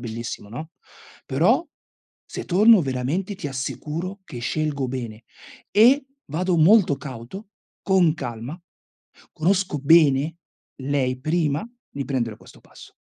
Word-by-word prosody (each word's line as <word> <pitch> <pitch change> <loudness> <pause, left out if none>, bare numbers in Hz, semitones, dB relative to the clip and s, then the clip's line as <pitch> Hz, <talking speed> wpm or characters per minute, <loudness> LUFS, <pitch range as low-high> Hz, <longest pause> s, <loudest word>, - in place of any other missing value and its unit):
bellissima, 115 -3 -6
no? 155 +9 -7 0.6
Però, 200 - +2 0.6
se - - -7
tonno 210 +4 +6
veramente, 140 +10 -2
ti 165 - -6
assicuro 155 +8 -5
che 130 -9 -9
scelgo 140 0 -1
bene. 120 -3 -6 0.5
E, 250 +7 +5 0.3
vado 180 +3 0
molto 175 -2 +5
cauto, 135 - -9 0.3
con 185 -5 +3
calma, 125 +1 -6 0.7
conosco 180 -1 0
bene 150 0 +4 0.4
lei, 130 -2 -1
prima, 155 - 0 0.2
di 140 -1 -4
prendere 120 -6 -2
questo - - -17
passo. - - -16
150 Hz, 115 wpm, -23 LUFS, 130-185 Hz, 0.7 s, tonno